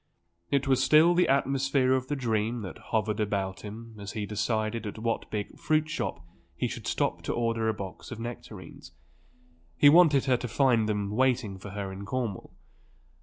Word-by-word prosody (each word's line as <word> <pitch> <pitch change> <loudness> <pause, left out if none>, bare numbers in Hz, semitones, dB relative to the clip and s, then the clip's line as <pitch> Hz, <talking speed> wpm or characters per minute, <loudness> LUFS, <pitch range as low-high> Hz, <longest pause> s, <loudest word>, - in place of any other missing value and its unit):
It 140 0 +1
was 130 -1 +3
still 155 +6 +6
the 180 +1 +3
atmosphere 135 -1 +2
of 130 -1 0
the 145 - -1
dream 115 -2 -1
that 90 - -9
hovered 110 -2 0
about 100 -2 -2
him 110 +2 -9
as 100 0 -7
he 105 -2 -3
decided 110 +2 -1
at 105 - -6
what 115 +1 -2
big 105 -1 -4
fruit 155 0 +1
shop 85 - -3 0.3
he - - -1
should - - -6
stop - - 0
to - - -3
order 115 -1 0
a - - +1
box 95 -3 -8
of 120 - -7
nectarines. 115 -4 -9 0.8
He 145 - +7
wanted 155 -4 +6
her 130 -2 +3
to 125 - -5
find 120 -3 +2
them 105 -1 -1
waiting 120 -4 +1
for 100 - -8
her 100 -1 -5
in 95 +1 -7
Cornwall. 120 -5 -3
115 Hz, 180 wpm, -28 LUFS, 105-130 Hz, 0.8 s, He